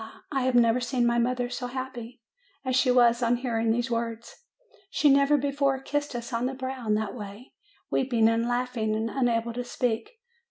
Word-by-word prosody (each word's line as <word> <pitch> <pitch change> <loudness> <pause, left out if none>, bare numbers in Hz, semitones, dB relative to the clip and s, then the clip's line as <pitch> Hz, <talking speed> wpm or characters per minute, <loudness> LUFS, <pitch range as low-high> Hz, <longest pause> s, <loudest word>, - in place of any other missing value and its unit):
I 270 -3 0
have 260 -1 +1
never 235 0 +4
seen 245 0 0
my 235 0 +2
mother 245 +1 0
so 245 +1 -4
happy 245 -2 -7 0.4
as 255 -1 0
she 265 0 +3
was 240 -1 +4
on 240 0 +3
hearing 230 -2 -1
these 235 +1 0
words; 230 0 -3 0.6
she 290 -4 +3
never 280 +1 +4
before 280 -1 0
kissed 290 0 -3
us 235 +1 -6
on 235 +2 0
the 265 - -4
brow 260 -2 -5
in 210 - +3
that 215 -1 -2
way, 210 +2 -9 0.4
weeping 240 -4 +2
and 230 +1 +1
laughing, 245 -3 -1
and 225 +1 -2
unable 235 -3 0
to 245 +1 -3
speak. 235 -2 -2
245 Hz, 190 wpm, -27 LUFS, 230-260 Hz, 0.6 s, never